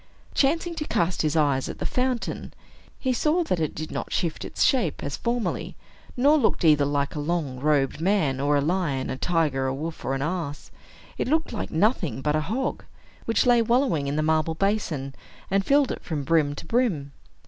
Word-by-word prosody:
Chancing 330 +5 +1
to 300 - -2
cast 175 - 0
his 155 0 0
eyes 140 -4 +2
at - - -6
the - - -4
fountain, 250 -1 -2 0.4
he 260 -1 0
saw 310 +7 +2
that 185 - -1
it 155 -2 -2
did 155 +1 -5
not - - -4
shift 170 -4 -1
its - - -1
shape, 235 - +1
as 140 0 -3
formerly, 235 +4 -2 0.4
nor 290 +5 +5
looked 220 -8 +1
either 150 -2 +5
like 140 0 -1
a 150 - -4
long 145 -4 -2
robed 145 0 +1
man, 170 -8 +1
or 145 +1 +2
a - - +2
lion, 150 -4 -1
a - - -2
tiger, 150 -5 +1
a 130 - -1
wolf, 160 +3 -5
or 135 - -1
an 135 - -2
ass. 160 -3 -4 0.5
It - - 0
looked 315 +1 +1
like 220 - -3
nothing 170 - 0
but 150 0 +1
a 155 - +1
hog, 235 - -2 0.4
which 225 - +2
lay 240 -1 +5
wallowing 235 - +1
in 140 - -1
the 155 - +1
marble 160 +1 +1
basin, 165 -8 -1 0.4
and 195 0 +2
filled 280 +3 +3
it - - -6
from 150 -4 -3
brim 145 -1 +2
to - - -8
brim. 175 - 0
165 Hz, 200 wpm, -25 LUFS, 145-235 Hz, 0.5 s, nor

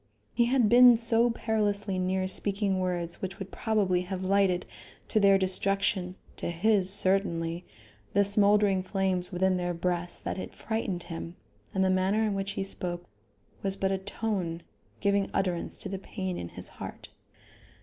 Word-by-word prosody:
He 235 0 +3
had 245 -2 +3
been 245 +1 +7
so 230 +1 +3
perilously 210 -4 -1
near 185 +1 0
speaking 195 0 +1
words 175 -2 -2
which 190 0 -5
would 195 -2 -8
probably 200 -5 0
have 185 +1 -5
lighted, 190 -2 +2 0.4
to 215 - +3
their 200 -1 +5
destruction 190 0 +1 0.2
to - - -3
his, 190 +2 +2
certainly 180 -4 +1 0.5
the 200 - +4
smoldering 200 -1 +4
flames 185 -1 -2
within 185 +1 +1
their 175 -1 -2
breast 175 0 -2
that - - -3
it - - -7
frightened 220 -6 -3
him, 165 0 -7 0.4
and 190 0 +1
the 185 - +2
manner 190 +4 +1
in 215 -2 0
which 195 0 -3
he 195 - -2
spoke 175 -2 -2 0.6
was 195 -1 0
but 195 -1 -1
a 190 - -1
tone 190 -4 -3 0.4
giving 200 -1 +1
utterance 180 -3 -1
to - - -1
the 195 0 -4
pain 190 -2 -5
in 85 - -6
his - - -8
heart. - - -9
195 Hz, 160 wpm, -28 LUFS, 180-205 Hz, 0.6 s, been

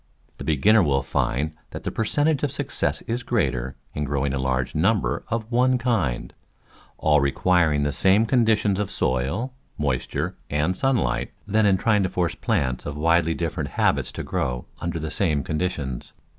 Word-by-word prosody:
The - - -5
beginner 100 +9 +4
will 70 -5 +2
find 75 +5 -1 0.2
that - - -8
the - - -2
per 110 - -1
centage 145 +4 +1
of 145 - 0
success 145 0 -2
is 120 +2 -3
greater 65 - -1 0.2
in 75 - -2
growing 70 -1 -1
a 70 - -1
large 65 -1 -1
num 100 +8 +3
ber - - -2
of 115 0 -3
one 125 +2 +3
kind, 105 - -1 0.6
all 75 -2 +3
requiring 75 +1 +2
the 70 0 0
same 95 +7 +4
conditions 110 -5 +2
of 105 - -1
soil, 70 - -1 0.2
moisture 65 -4 -2
and 75 +5 0
sunlight, 120 - 0 0.2
than 105 +1 +2
in 95 -1 +4
trying 105 0 +2
to 95 - 0
force 90 -2 0
plants 65 -1 -1
of 75 0 -5
widely 85 +1 +2
different 80 -3 -3
habits - - +2
to - - -5
grow 60 -1 -2 0.2
under 85 0 -2
the 80 -1 -4
same 80 -9 +1
conditions. 75 -6 -3
85 Hz, 170 wpm, -24 LUFS, 70-110 Hz, 0.6 s, beginner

